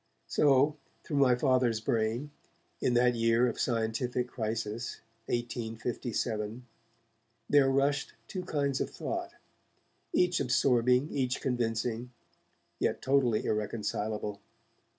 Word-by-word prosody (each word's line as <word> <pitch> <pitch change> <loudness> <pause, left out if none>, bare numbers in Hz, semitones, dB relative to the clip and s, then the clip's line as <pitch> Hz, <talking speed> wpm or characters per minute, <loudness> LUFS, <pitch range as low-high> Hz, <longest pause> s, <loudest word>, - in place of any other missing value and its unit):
So, 145 +1 +3 0.3
through 145 - -3
my 130 -3 +5
Father's 125 -3 +2
brain, 115 +5 -1 0.5
in 125 - +2
that 125 0 +4
year 115 +1 +3
of 120 - -2
scientific 120 +1 0
crisis, 110 0 -3 0.3
1857, 115 -1 -3 0.8
there 140 -2 +5
rushed 140 +1 +1
two 185 -3 -4
kinds 140 -4 -1
of - - -1
thought, - - -4 0.8
each 180 -1 +2
absorbing, 125 +2 +3
each 130 -2 0
convincing, 120 -1 -1 0.7
yet - - 0
totally 130 -5 +2
irreconcilable. 105 -1 -2
120 Hz, 100 wpm, -30 LUFS, 115-135 Hz, 0.8 s, my